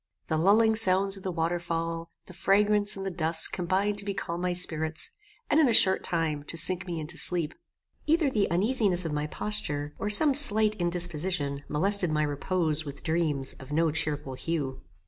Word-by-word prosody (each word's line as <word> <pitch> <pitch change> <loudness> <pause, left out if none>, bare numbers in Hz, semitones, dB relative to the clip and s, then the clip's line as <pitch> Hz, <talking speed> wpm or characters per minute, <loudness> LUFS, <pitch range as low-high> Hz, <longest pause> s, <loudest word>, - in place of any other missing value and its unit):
The 160 - -1
lulling 220 +6 +2
sounds 195 -2 +1
of 195 - -8
the 185 - -5
waterfall, 165 0 -4 0.2
the 185 - -14
fragrance 205 +2 +1
and 195 - -7
the 195 - -4
dusk 165 -1 +4
combined 195 +3 -1
to - - -4
becalm 190 -4 -5
my 180 0 -2
spirits, 160 -3 -1 0.4
and, 300 - +1
in 295 -5 +3
a - - +1
short 190 -3 +5
time, 160 -4 -3
to 165 - -4
sink 185 +3 +3
me 170 -2 -5
into 160 +2 -2
sleep. 170 -4 +2 0.5
Either 320 0 +1
the 210 -5 -1
uneasiness 195 -1 0
of 160 - -4
my 150 0 -3
posture, 145 +6 -4
or 210 - -3
some 280 +8 +7
slight 220 -6 +5
indisposition 170 -4 -2
molested 185 +4 +4
my 155 0 -1
repose 155 +1 -1
with 140 -2 -10
dreams 160 -5 -1
of 130 +2 -13
no 160 +1 0
cheerful 150 -3 -3
hue. 140 -1 -5
175 Hz, 180 wpm, -26 LUFS, 155-195 Hz, 0.5 s, some